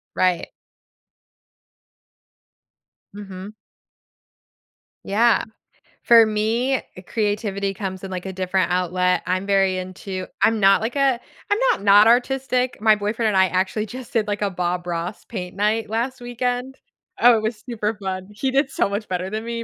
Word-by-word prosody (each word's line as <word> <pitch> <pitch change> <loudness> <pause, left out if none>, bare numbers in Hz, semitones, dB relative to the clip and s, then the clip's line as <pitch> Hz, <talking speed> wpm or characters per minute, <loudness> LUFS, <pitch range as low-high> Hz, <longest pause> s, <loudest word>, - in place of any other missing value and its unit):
Right. 180 -2 +1 2.6
Mhm. 200 0 -9 1.5
Yeah, 230 +4 +3 0.6
for 230 -1 +7
me, 225 +5 0 0.3
creativity 205 -2 -1
comes 190 -1 -6
in, 190 - -6
like, 185 0 -5
a 190 - -5
different 185 0 0
outlet, 180 0 +1
I'm 185 +2 -1
very 195 -2 +2
into 185 0 -6 0.2
I'm 225 -1 +3
not 195 +1 +5
like 235 +5 -3
a 270 -3 +2 0.3
I'm 410 - +3
not - - -3
not 205 +2 +7
artistic. 255 0 +1
My 215 -1 +5
boyfriend 215 +2 -1
and 195 - +1
I 190 0 +5
actually 190 +4 -1
just 250 +4 -9
did, 220 -3 +1
like, 205 0 -2
a 200 - +1
Bob 180 -1 -3
Ross 175 +3 -4
paint 180 -4 -6
night 215 +1 0
last 245 +4 -2
weekend, 245 +2 -3 0.4
oh, 245 -1 +7
it 220 - 0
was 220 0 -3
super 215 -1 -2
fun. 190 -1 -5
He 260 +6 -2
did 270 +1 +1
so - - +1
much 205 +2 -4
better 180 +1 -2
than 215 +2 -4
me, 230 0 -4
210 Hz, 155 wpm, -22 LUFS, 190-235 Hz, 2.6 s, for